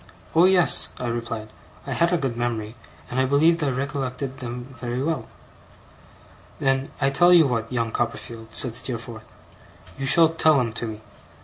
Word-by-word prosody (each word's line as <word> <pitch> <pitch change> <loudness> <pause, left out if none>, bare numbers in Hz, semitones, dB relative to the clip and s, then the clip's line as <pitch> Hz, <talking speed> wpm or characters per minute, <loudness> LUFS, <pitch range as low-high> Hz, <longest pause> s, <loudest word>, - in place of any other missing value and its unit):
'Oh 165 +2 +6
yes,' 185 -2 +5
I 125 - -5
replied; 115 -2 -4 0.4
I - - -3
had 170 +1 +2
a 175 - +2
good 135 -6 -2
memory, 115 -3 -3 0.4
and 125 - -1
I 130 - +3
believed 155 +5 +3
I 145 - +1
recollected 135 0 -4
them 125 +1 -7
very 120 0 -3
well. 140 -4 -2 1.3
'Then 135 0 0
I 135 -1 +2
tell 175 +5 +5
you 170 -3 +7
what, 115 -3 -2
young 115 -2 -1
Copperfield,' 115 -1 -5
said 125 - -1
Steerforth, 120 -2 -4 0.6
'you 135 - -1
shall 165 +3 +6
tell 160 -2 +3
'em 115 -3 -1
to 115 0 -4
me. 110 -1 -7
130 Hz, 170 wpm, -23 LUFS, 115-145 Hz, 1.3 s, you